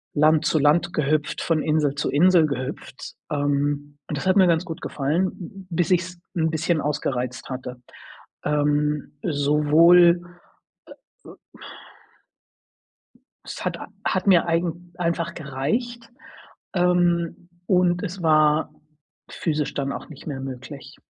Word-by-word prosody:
Land 155 +1 +4
zu 155 - +2
Land 165 +4 +2
gehüpft, 150 0 0
von 165 -2 +1
Insel 150 -2 +1
zu 145 - -2
Insel 170 +2 +4
gehüpft. 130 -1 -6 0.2
Ähm, 145 0 -1
und 150 - -3
das - - -5
hat 185 +1 +3
mir 190 -2 +6
ganz 170 +1 +2
gut 165 -1 -7
gefallen, 155 +6 0
hm, 185 +1 -10
bis 175 +1 0
ich's 180 0 0 0.2
'n 160 -1 +1
bisschen 160 0 0
ausgereizt 130 -5 -3
hatte. 125 -1 -6 0.6
Ähm, 150 0 0
sowohl, 165 +4 +5 1.0
äh, - - -13
ö - - -12 2.1
es - - -7
hat - - -2
a - - -9 0.2
hat - - -1
mir 180 -3 +5
eigen 170 +1 -2
einfach 170 -1 -2
gereicht. 225 - -3 0.6
Ähm, 175 -1 +1 0.2
und 180 -2 +2
es 190 -2 -5
war 155 -1 +3 0.5
physisch 150 -2 -2
dann 140 -1 -2
auch - - -7
nicht 155 0 -13
mehr 135 -3 -4
möglich. 135 +1 -8
155 Hz, 130 wpm, -23 LUFS, 145-175 Hz, 2.1 s, mir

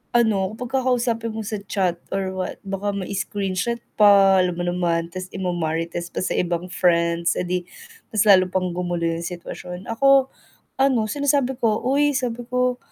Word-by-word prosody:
ano 215 -4 +2
kapag 250 +3 -2
kakausapin 235 -3 0
mo 220 - -3
sa 210 0 -4
chat 180 -4 0
or 190 -1 -2
what 185 0 -4
baka 195 +1 -3
may 190 -2 -4
screenshot 200 +2 -2 0.2
pa, 195 -2 +6
alam 180 -1 -1
mo 175 - -2
naman, 170 -1 0
tas 185 0 -6
ima-marites 170 -2 -2
pa - - -4
sa - - -1
ibang 175 0 -1
friends, 170 -1 +2
eh - - -1
'di 180 0 -1 0.5
mas 215 -1 +1
lalo 185 -3 +6
pang 185 -1 -1
gumulo 175 -1 -2
yung 165 0 -2
sitwasyon. 180 +1 -7
Ako, 270 +3 +4 0.5
ano 265 -3 +3
sinasabi 280 -1 +1
ko, 220 -3 +1
"Uy" 285 +3 +2
sabi 245 -2 -3
ko, 250 0 0
195 Hz, 165 wpm, -22 LUFS, 180-235 Hz, 0.5 s, pa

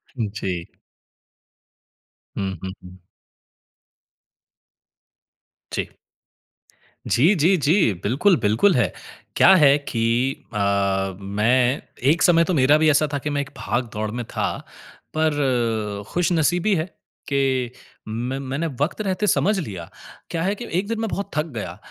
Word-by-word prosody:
जी। 100 -7 -3 1.7
हुँ, 95 -1 -2
हुँ, 95 - -4
हुँ। 90 0 -12 2.8
जी। - - -2 1.2
जी, 160 - +4
जी, 170 +4 +4
जी। 155 - +3
बिल्कुल, 145 - +3
बिल्कुल 110 - +3
है। 125 - +2 0.4
क्या 190 - +7
है 145 -5 +6
कि 120 -1 -1
अ, 100 -2 0
मैं 120 +7 +1 0.3
एक 165 - 0
समय 170 -1 +5
तो 185 - -1
मेरा 145 0 +5
भी 155 0 +3
ऐसा 155 +1 +3
था - - +1
कि 150 - -4
मैं 145 -1 0
एक 140 - -7
भाग 120 +1 -2
दौड़ 105 0 -2
में 120 +2 -4
था। - - -2 0.6
पर, 120 -9 0
खुशनसीबी 175 +3 +1
है 160 -2 -1 0.4
कि 135 -3 0 0.4
में 120 +4 -3
मैंने 135 +4 -3
वक़्त 160 +8 -1
रहते 205 +1 -1
समझ 205 +1 +2
लिया। 95 - -6 0.4
क्या 165 -1 -2
है 195 +3 0
कि 240 - -7
1 200 - -4
दिन 230 0 -2
मैं 225 - -1
बहुत 200 - -4
थक 150 - +1
गया, 90 -5 -5
135 Hz, 135 wpm, -22 LUFS, 110-165 Hz, 2.8 s, क्या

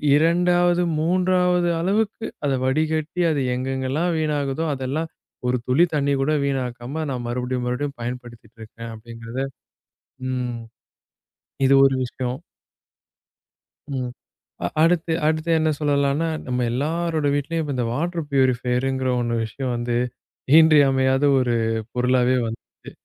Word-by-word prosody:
இரண்டாவது, 175 +2 +3 0.2
3 180 +1 +2
அளவுக்கு 210 +4 0 0.2
அத 140 - +1
வடிகட்டி 155 +4 0
அது 145 - 0
எங்கெங்கெல்லாம் 135 +6 -1
வீணாகுதோ, 150 0 -1
அதெல்லாம் 140 +5 -3 0.4
ஒரு 125 0 +2
துளி 130 +7 +4
தண்ணி 140 -1 +1
கூட 145 +3 +1
வீணாக்காம 130 +2 -3
நான் 125 -2 -4
மறுபடியும் 125 +1 -2
மறுபடியும் 140 +3 -3
பயன்படுத்திக்கிட்டு 120 -2 -8
இருக்கேன் 115 +1 -9
அப்டிங்கிறதை 115 +3 -6 0.8
ம். 125 -2 -3 1.0
இது 135 - +5
ஒரு 135 -1 +3
விஷயம். 125 0 -4 1.6
ம். 125 -1 -3 0.6
அ - - +2
அடுத்து, 165 0 +3
அடுத்து 155 +1 0
என்ன 155 - +2
சொல்லலாம்னா, 145 +1 +1 0.2
நம்ம 125 -1 0
எல்லாரோட 155 +3 -1
வீட்டிலேயும் 160 +3 -1
இப்ப 145 -3 -3
இந்த 125 -2 0
வாட்டர் 170 +3 -2
ப்யூரிபயர்ங்கிற 130 0 +1
ஒண்ணு 120 -1 -1
விஷயம் 125 +3 -4
வந்து 120 0 -1 0.6
இன்றியமையாத 135 -4 +4 0.2
ஒரு 120 -2 +1 0.4
பொருளாவே 125 0 +2
வந்துருச்சு. 115 0 -10
135 Hz, 115 wpm, -23 LUFS, 125-160 Hz, 1.6 s, இது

